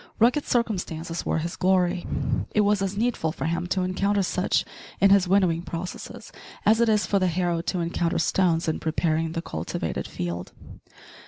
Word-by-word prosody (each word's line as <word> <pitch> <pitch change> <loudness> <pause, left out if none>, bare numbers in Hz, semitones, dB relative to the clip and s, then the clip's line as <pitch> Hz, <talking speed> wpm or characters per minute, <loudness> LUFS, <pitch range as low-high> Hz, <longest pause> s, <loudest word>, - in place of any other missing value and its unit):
Rugged 245 +6 +3
circumstances 175 -8 -2
were - - +1
his 170 +2 -3
glory. 180 -1 +1 0.5
It 210 - +5
was 205 -1 +2
as 195 0 -2
needful 220 -8 0
for 140 - -5
him 170 +2 -1
to 185 0 0
encounter 195 +2 +1
such 180 +1 0 0.3
in 195 0 +5
his 195 -2 +5
winnowing 180 -3 +3
processes 170 +1 -7 0.3
as 220 +2 +5
it 235 - +4
is 210 -3 +3
for 200 +1 +1
the 185 - +2
harrow 175 -1 0
to 175 +1 -2
encounter 170 0 -1
stones 170 -3 +2
in 160 - 0
preparing 160 0 0
the 165 -1 -3
cultivated 80 - -4
field. 85 0 -5
180 Hz, 170 wpm, -25 LUFS, 165-200 Hz, 0.5 s, It